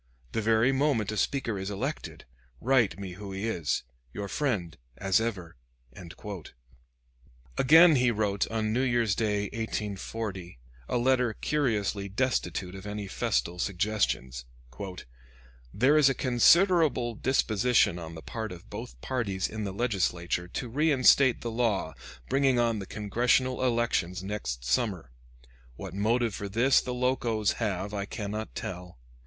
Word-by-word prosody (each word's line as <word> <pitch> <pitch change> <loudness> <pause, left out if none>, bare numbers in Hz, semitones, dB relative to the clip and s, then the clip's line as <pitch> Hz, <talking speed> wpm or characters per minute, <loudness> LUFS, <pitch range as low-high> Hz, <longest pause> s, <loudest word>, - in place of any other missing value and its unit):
The 110 - -1
very 110 +4 +3
moment 135 -6 +1
a - - -4
speaker 115 -3 -1
is 95 +1 -4
elected, 100 -1 -5 0.3
write 120 -8 +2
me 95 -2 -6
who 100 +2 -8
he 95 +4 -3
is. 85 -9 -1 0.3
Your 100 - -4
friend, 100 - -2 0.2
as 95 +2 +2
ever." 95 - -4 2.0
Again 160 +4 +7
he 125 0 +3
wrote, 105 -3 0
on 110 -1 -1
New 125 - +1
Year's 120 -5 +2
Day, 105 -1 0
1840, 105 - -4 0.3
a - - +1
letter 125 -2 +2
curiously 105 -8 -1
destitute 100 -5 -1
of 95 +1 -9
any 105 0 -4
festal 85 -1 -1
suggestions: 90 - -1 1.3
"There 130 - +3
is 140 -2 +6
a 135 - 0
considerable 140 - +4
disposition 115 -5 +2
on 80 -1 -8
the 80 - -10
part 110 -2 -5
of 90 -2 -11
both - - -8
parties 105 -8 -2
in 110 -1 -5
the 100 - -3
Legislature 90 -5 -1
to 120 - -5
reinstate 135 -1 +4
the 120 - -4
law 110 -8 0 0.3
bringing 135 -2 +2
on 115 -2 +1
the 95 - -7
Congressional 125 +5 +1
elections 115 -7 0
next 95 -12 -4
summer. 80 - -1 0.6
What - - -8
motive 115 +3 +1
for 100 +1 -5
this 120 +7 +4
the 125 - -5
Locos 125 -4 0
have, 100 -2 -2
I 100 -1 -2
cannot 105 +1 -5
tell. 90 -3 -6
110 Hz, 135 wpm, -28 LUFS, 95-125 Hz, 2.0 s, Again